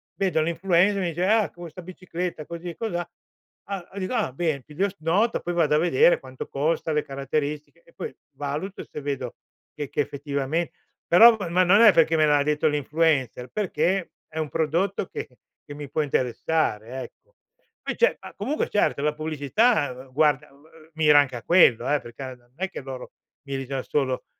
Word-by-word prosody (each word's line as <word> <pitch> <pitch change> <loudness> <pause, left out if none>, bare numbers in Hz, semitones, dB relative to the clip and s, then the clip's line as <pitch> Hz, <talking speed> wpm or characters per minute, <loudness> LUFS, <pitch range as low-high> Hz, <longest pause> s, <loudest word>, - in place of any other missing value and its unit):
vedo 185 -5 +1
l'influencer, 175 +4 +2
mi 180 - 0
dice: 170 +2 -1
"Ah, 220 0 +3
questa 175 +1 -10
bicicletta 180 -2 -5
così 170 +2 -7
e 170 - -7
cosà" 175 -7 -3 0.6
ah 195 -3 -6
ah, 200 - -7
dico: 185 +7 -3
"Ah 220 - 0
bene!" 150 -4 -1
Piglio 185 +7 -1
s 195 - -15
nota, 185 +9 +1
poi 175 - -3
vado 165 -3 +2
a - - +4
vedere 170 0 +4
quanto 130 -1 -8
costa, 155 +3 -1
le 150 - +1
caratteristiche 145 - -4
e - - -22
poi 465 - -6 0.2
valuto 150 +7 -5
e - - -9
se 150 - -6
vedo 135 -4 -4 0.4
che 145 -2 -5
che - - -5
effettivame 140 +3 -2 0.4
però 225 +7 +8
ma 180 +2 +3
non 200 +5 +5
è 220 -4 +8
perché 165 0 +4
me 155 - +5
l'ha 145 -1 +4
detto 150 +1 +1
l'influencer, 145 -4 0
perché 190 -2 -1 0.2
è 155 - -11
un 155 -2 -2
prodotto 170 +6 0
che - - -6 0.4
che 145 - -9
mi 145 -1 -8
può 155 - 0
interessare, 130 -3 -1
ecco. - - -13 0.5
Poi - - -4
ce 475 - +3
ma, - - -10
comunque, 300 +3 -2
certo, 205 -8 +1
la 150 +1 +1
pubblicità, 155 - +1 0.2
uhm, - - -22
guarda, 150 0 +2
uhm, 140 +3 -21 0.3
mira 150 -2 +6
anche 130 -3 +1
a 120 - -7
quello, 170 -9 +5
eh, 150 - +3
per 120 -1 -11
ca 130 -1 -7
da 120 - -26
non 120 - -33
è 190 +2 -2
che - - -7
loro 130 -1 -8 0.4
miri 135 -1 -3
da 135 0 -3
solo 130 -3 -1
155 Hz, 195 wpm, -25 LUFS, 140-180 Hz, 0.6 s, però